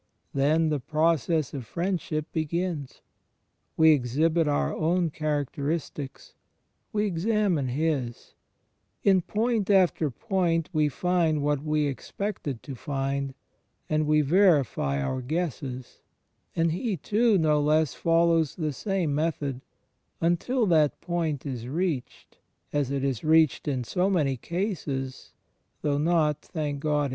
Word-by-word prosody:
Then 155 Hz, +4 st, +2 dB
the 150 Hz, -2 st, 0 dB
process 155 Hz, 0 st, +1 dB
of 135 Hz, -3 st, -4 dB
friendship 170 Hz, -, -2 dB
begins; 160 Hz, -2 st, -3 dB, 0.7 s
we 160 Hz, 0 st, +7 dB
exhibit 155 Hz, +5 st, +2 dB
our 145 Hz, -, 0 dB
own 170 Hz, +1 st, +1 dB
characteristics; 145 Hz, -1 st, -3 dB, 0.6 s
we 210 Hz, -2 st, +1 dB
examine 190 Hz, -, +1 dB
his: 135 Hz, -3 st, -2 dB, 0.7 s
in 190 Hz, -2 st, +5 dB
point 220 Hz, +2 st, 0 dB
after 185 Hz, -6 st, +3 dB
point 175 Hz, -, 0 dB
we 155 Hz, -2 st, +2 dB
find 165 Hz, -1 st, +1 dB
what 145 Hz, -1 st, 0 dB
we 150 Hz, -1 st, +1 dB
expected 145 Hz, -, -4 dB
to 140 Hz, -, -7 dB
find, 135 Hz, +1 st, -3 dB, 0.5 s
and 155 Hz, 0 st, +1 dB
we 150 Hz, 0 st, +4 dB
verify 145 Hz, -, +3 dB
our 130 Hz, -, -2 dB
guesses; 135 Hz, -3 st, -4 dB, 0.5 s
and 165 Hz, 0 st, +2 dB
he 195 Hz, +3 st, -2 dB
too, 215 Hz, -, +2 dB
no 155 Hz, -3 st, +3 dB
less, 155 Hz, 0 st, +2 dB
follows 165 Hz, -2 st, +2 dB
the 155 Hz, -4 st, -2 dB
same 185 Hz, -1 st, -1 dB
method, 145 Hz, -4 st, -1 dB, 0.6 s
imtil 210 Hz, +8 st, +1 dB
that 155 Hz, -4 st, +3 dB
point 165 Hz, -6 st, -2 dB
is 125 Hz, -4 st, -5 dB
reached 155 Hz, -2 st, -3 dB, 0.3 s
(as 145 Hz, -3 st, +1 dB
it 140 Hz, -1 st, -2 dB
is 135 Hz, -5 st, -1 dB
reached 160 Hz, -2 st, +3 dB
in 130 Hz, -4 st, -1 dB
so 180 Hz, -, 0 dB
many 150 Hz, -8 st, +1 dB
cases, 145 Hz, -, -4 dB, 0.5 s
though 145 Hz, -1 st, +1 dB
not, 155 Hz, -2 st, +2 dB
thank 150 Hz, -3 st, -4 dB
God! 150 Hz, -1 st, 0 dB
155 Hz, 125 wpm, -27 LUFS, 140-175 Hz, 0.7 s, we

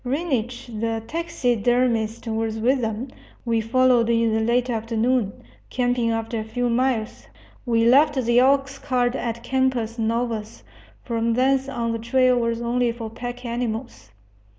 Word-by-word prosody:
Reinisch 255 Hz, -4 st, -2 dB, 0.2 s
the 225 Hz, -1 st, -1 dB
taxidermist 245 Hz, -7 st, 0 dB
was 225 Hz, -1 st, -2 dB
with 250 Hz, +4 st, +2 dB
them. 225 Hz, +3 st, -3 dB, 0.4 s
We 230 Hz, -1 st, +1 dB
followed 245 Hz, 0 st, +3 dB
in 230 Hz, -1 st, +2 dB
the 220 Hz, -, +2 dB
late 235 Hz, +2 st, +1 dB
afternoon, 230 Hz, -1 st, 0 dB, 0.4 s
camping 245 Hz, -2 st, 0 dB
after 225 Hz, 0 st, -2 dB
a -, -, -3 dB
few 245 Hz, +2 st, -2 dB
miles. 240 Hz, -2 st, -1 dB, 0.4 s
We 230 Hz, -1 st, +2 dB
left 290 Hz, +5 st, +5 dB
the 240 Hz, -2 st, +3 dB
oxcart 265 Hz, -2 st, +1 dB
at 235 Hz, -3 st, -4 dB
Campos 250 Hz, -3 st, 0 dB
Novos; 225 Hz, -1 st, -2 dB, 0.4 s
from 230 Hz, -1 st, -1 dB
thence 265 Hz, +2 st, +2 dB
on 235 Hz, -3 st, -2 dB
the 230 Hz, -, -3 dB
trail 255 Hz, +2 st, +3 dB
was 230 Hz, 0 st, -1 dB
only 240 Hz, 0 st, +1 dB
for 230 Hz, -2 st, -7 dB
pack 245 Hz, +2 st, -7 dB
animals. 235 Hz, -, -4 dB
235 Hz, 140 wpm, -23 LUFS, 225-255 Hz, 0.4 s, left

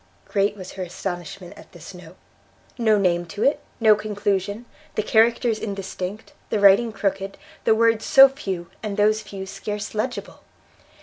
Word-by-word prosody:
Great 200 Hz, +1 st, 0 dB
was 185 Hz, -1 st, -8 dB
her 190 Hz, -, -8 dB
astonishment 175 Hz, 0 st, -6 dB
at -, -, -16 dB
this -, -, -11 dB
note! -, -, -13 dB, 0.6 s
no 220 Hz, -3 st, +3 dB
name 175 Hz, -3 st, +1 dB
to 200 Hz, +5 st, -5 dB
it, 280 Hz, -, +3 dB, 0.2 s
no 220 Hz, -2 st, +6 dB
conclusion, 205 Hz, 0 st, -2 dB, 0.3 s
the 215 Hz, -, 0 dB
characters 230 Hz, +1 st, +3 dB
indistinct, 200 Hz, 0 st, -6 dB, 0.2 s
the 215 Hz, -, 0 dB
writing 205 Hz, +4 st, +5 dB
crooked, 195 Hz, -1 st, -3 dB, 0.3 s
the 220 Hz, -, +5 dB
words 230 Hz, 0 st, +3 dB
so 270 Hz, 0 st, +8 dB
few, 195 Hz, -, -6 dB
and 210 Hz, -2 st, -4 dB
those 215 Hz, +1 st, +3 dB
few 195 Hz, -2 st, -8 dB
scarce 205 Hz, +2 st, -5 dB
legible! 215 Hz, 0 st, -4 dB
205 Hz, 150 wpm, -23 LUFS, 195-220 Hz, 0.6 s, so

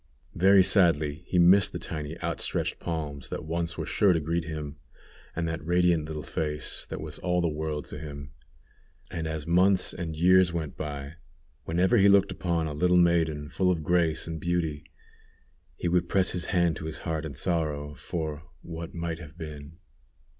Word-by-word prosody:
Very 95 Hz, +2 st, +6 dB
sadly 80 Hz, -4 st, +2 dB
he 90 Hz, -, 0 dB
missed 90 Hz, +3 st, +6 dB
the -, -, -2 dB
tiny 75 Hz, +1 st, -5 dB
outstretched 85 Hz, -2 st, -1 dB
hands 75 Hz, -5 st, -4 dB
that -, -, -5 dB
once 85 Hz, +1 st, -2 dB
were -, -, -3 dB
sure 100 Hz, -4 st, +3 dB
to 80 Hz, -, +1 dB
greet 85 Hz, +2 st, -1 dB
him, 75 Hz, -3 st, -6 dB, 0.6 s
and 85 Hz, 0 st, -1 dB
that 80 Hz, 0 st, -4 dB
radiant 85 Hz, -1 st, +2 dB
little 75 Hz, -1 st, -5 dB
face 75 Hz, 0 st, -3 dB
that -, -, -5 dB
was -, -, -7 dB
all 90 Hz, 0 st, 0 dB
the 85 Hz, -, +2 dB
world 75 Hz, -2 st, -3 dB
to -, -, -8 dB
him; 70 Hz, -2 st, -8 dB, 0.8 s
and 85 Hz, -3 st, -3 dB
as 80 Hz, -2 st, -4 dB
months 90 Hz, +3 st, +3 dB
and 80 Hz, -3 st, -5 dB
years 90 Hz, +2 st, +5 dB
went 80 Hz, -3 st, -4 dB
by, 70 Hz, +1 st, -6 dB, 0.5 s
whenever 90 Hz, +8 st, +2 dB
he 100 Hz, -1 st, +6 dB
looked 100 Hz, 0 st, +5 dB
upon 85 Hz, -3 st, -1 dB
a 75 Hz, -, -3 dB
little 90 Hz, +4 st, +3 dB
maiden 80 Hz, -4 st, +2 dB
full 90 Hz, +5 st, 0 dB
of 85 Hz, -4 st, 0 dB
grace 85 Hz, -1 st, +1 dB
and 80 Hz, -1 st, -5 dB
beauty, 85 Hz, -4 st, -1 dB, 0.9 s
he 85 Hz, -, -3 dB
would 85 Hz, 0 st, +1 dB
press 95 Hz, -2 st, +3 dB
his 90 Hz, -2 st, -2 dB
hand 85 Hz, -3 st, +1 dB
to 80 Hz, -, -7 dB
his 80 Hz, -, -5 dB
heart 80 Hz, -2 st, -2 dB
in 75 Hz, -3 st, -6 dB
sorrow, 75 Hz, -2 st, -1 dB
for 75 Hz, -1 st, -4 dB, 0.2 s
"what 85 Hz, 0 st, -7 dB
might 85 Hz, -1 st, -3 dB
have 80 Hz, -2 st, -12 dB
been." 75 Hz, -1 st, -8 dB
80 Hz, 180 wpm, -27 LUFS, 75-90 Hz, 0.9 s, Very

